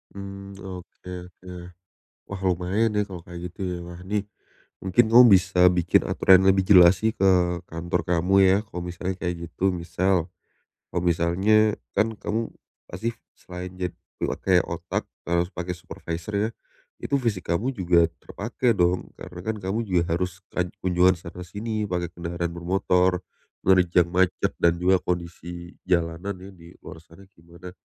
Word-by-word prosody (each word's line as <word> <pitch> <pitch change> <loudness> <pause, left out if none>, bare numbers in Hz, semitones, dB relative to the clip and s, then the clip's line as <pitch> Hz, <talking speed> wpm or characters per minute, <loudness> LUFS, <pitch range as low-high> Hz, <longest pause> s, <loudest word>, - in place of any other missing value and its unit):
Mmm, 100 0 -8
oke 90 -1 -10 0.2
oke. 90 0 -14 0.8
Wah, 100 -1 -7
lumayan 95 +5 +1
ya 105 -1 0
kalau 90 -3 -9
kayak 85 0 -9
gitu 90 - -12
ya. 90 -1 -2
Wah 85 0 -9
nih, 100 +2 -2 0.6
mungkin 95 +5 +4
kamu 125 +2 +9
bisa 90 -1 +4
bikin 90 -1 +2
aturan 95 0 +5
lebih 95 0 +4
jelas 90 -2 +7
sih, 110 0 +1
ke 95 - +2 0.4
kantor 85 +1 -2
kamu 90 +2 +1
ya, 95 +1 +5
kalau 90 -4 -6
misalnya 90 +1 -4
kayak 90 -1 -1
gitu. 95 +3 0
Misal, 90 0 0 0.7
kalau 90 - -1
misalnya 95 +6 +3 0.2
kan 110 +2 +2
kamu 110 +2 -3 0.4
pasti 115 +6 -4 0.2
selain 90 0 -8
jad 90 -1 -2 0.3
pakai - - +2
otak, - - -3 0.2
harus 85 +1 +1
pakai 90 0 -4
supervisor 85 +2 -7
ya. 105 +2 +1 0.5
Itu 140 - 0
fisik 105 -7 -2
kamu 120 +10 0
juga 90 -6 +3 0.2
terpakai 115 +3 -1
dong, 90 0 +1
karena 90 - -9
kan 110 0 -2
kamu 95 +3 -2
juga 90 -2 +2
harus 90 0 -3
kaj 90 0 -1 0.2
kunjungan 90 0 +4
sana 85 +1 -9
sini 105 +2 -3
pakai 90 -2 -2
kendaraan 85 0 -4
bermotor, 90 +1 +1 0.4
menerjang 90 -2 +4
macet 90 0 +1
dan 85 0 +4
juga 90 +1 +3
kondisi 85 0 -5 0.2
jalanan 85 +3 0
ya, 95 +2 -11
di 85 -2 -16
luar 80 - -10
sana 85 +4 -17
di 95 -3 -26
mana. 85 +2 -11
90 Hz, 155 wpm, -25 LUFS, 85-95 Hz, 0.8 s, kamu